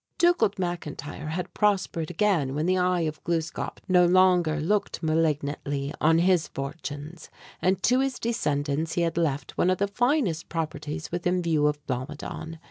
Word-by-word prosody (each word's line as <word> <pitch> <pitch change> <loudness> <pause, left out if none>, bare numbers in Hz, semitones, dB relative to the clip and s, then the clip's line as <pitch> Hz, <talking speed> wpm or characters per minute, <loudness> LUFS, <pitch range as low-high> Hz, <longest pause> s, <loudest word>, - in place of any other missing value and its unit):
Dugald 345 - +3
McIntyre 155 -5 -4
had 175 +4 -4
prospered 195 -6 +1
again 170 -7 +1
when 150 +2 0
the 185 +1 +2
"Eye 180 -1 +2
of 155 -1 -3
Gluskâp" 165 -1 -2
no 180 -2 +5
longer 175 -3 +4
looked 195 +3 -1
malignantly 145 -3 0
on 160 +1 +5
his 175 -1 +3
fortunes; 145 +3 -7 0.3
and 190 +1 +1
to 250 +1 +4
his 270 -1 0
descendants 155 -8 -1
he 175 - 0
had 165 -1 -1
left 145 -5 -1
one 180 - +4
of 185 - +2
the 200 - +1
finest 230 - 0
properties 155 -1 -4
within 175 +1 0
view 155 -3 +2
of 150 0 -2
Blomidon. 145 +5 -5
165 Hz, 155 wpm, -26 LUFS, 150-185 Hz, 0.3 s, no